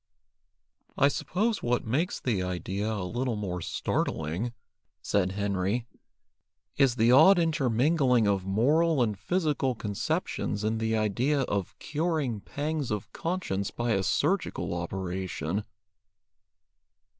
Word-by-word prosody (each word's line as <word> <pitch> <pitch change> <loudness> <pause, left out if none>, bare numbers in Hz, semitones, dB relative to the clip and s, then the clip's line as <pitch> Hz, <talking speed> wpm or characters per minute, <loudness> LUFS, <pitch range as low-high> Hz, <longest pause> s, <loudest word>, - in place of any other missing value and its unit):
"I 140 - +5
suppose 215 +9 -1
what 120 0 0
makes 150 - 0
the 110 -7 0
idea 95 +4 -2
a 105 -4 -2
little 120 +3 -1
more 95 -4 -3
startling," 80 +9 -2 0.5
said 95 -2 0
Henry, 100 +3 -1 0.9
"is 135 -4 +3
the 115 0 +4
odd 160 +9 +8
intermingling 135 -5 +2
of 100 -2 +1
moral 140 - +3
and 110 -3 -1
physical 150 - 0
conceptions 105 0 -2
in 110 +1 0
the 110 0 0
idea 120 +7 +1
of 100 -7 -2
curing 150 -7 -1
pangs 150 +1 -3
of 105 -2 -4
conscience 165 - -2
by 120 0 -2
a 100 -3 +2
surgical 95 - 0
operation." 90 +1 -3
115 Hz, 115 wpm, -28 LUFS, 100-145 Hz, 0.9 s, odd